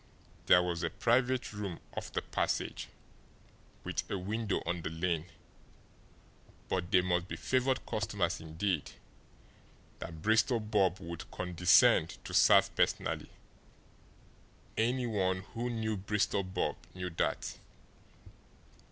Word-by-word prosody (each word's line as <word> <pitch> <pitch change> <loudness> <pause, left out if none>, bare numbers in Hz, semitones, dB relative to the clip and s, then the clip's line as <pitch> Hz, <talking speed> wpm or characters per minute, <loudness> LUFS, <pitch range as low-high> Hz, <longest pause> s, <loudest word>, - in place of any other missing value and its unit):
There 90 - +7
was 85 -2 -2
a 85 - 0
private 125 +5 +1
room 100 -4 -5 0.2
off - - -5
the - - -2
passage, - - -2 1.0
with - - -1
a 100 - -1
window 105 +2 -2
on 85 -1 -2
the 80 - -3
lane; 85 0 -1 1.4
but 90 -2 -1
they 90 - +5
must 90 0 0
be - - -5
favoured 130 0 0
customers 100 -4 -1
indeed 80 +1 -2 1.1
that 80 -2 -8
Bristol 110 +3 +3
Bob 100 -4 +1
would 85 0 -7
condescend 90 0 +4
to - - -7
serve - - +5
personally - - 0 1.5
any 125 +3 +1
one 95 -5 0
who 120 +2 -2
knew 110 -2 -1
Bristol 100 0 0
Bob 95 0 -2 0.2
knew 90 -1 -4
that. 80 - -2
95 Hz, 115 wpm, -32 LUFS, 90-110 Hz, 1.5 s, There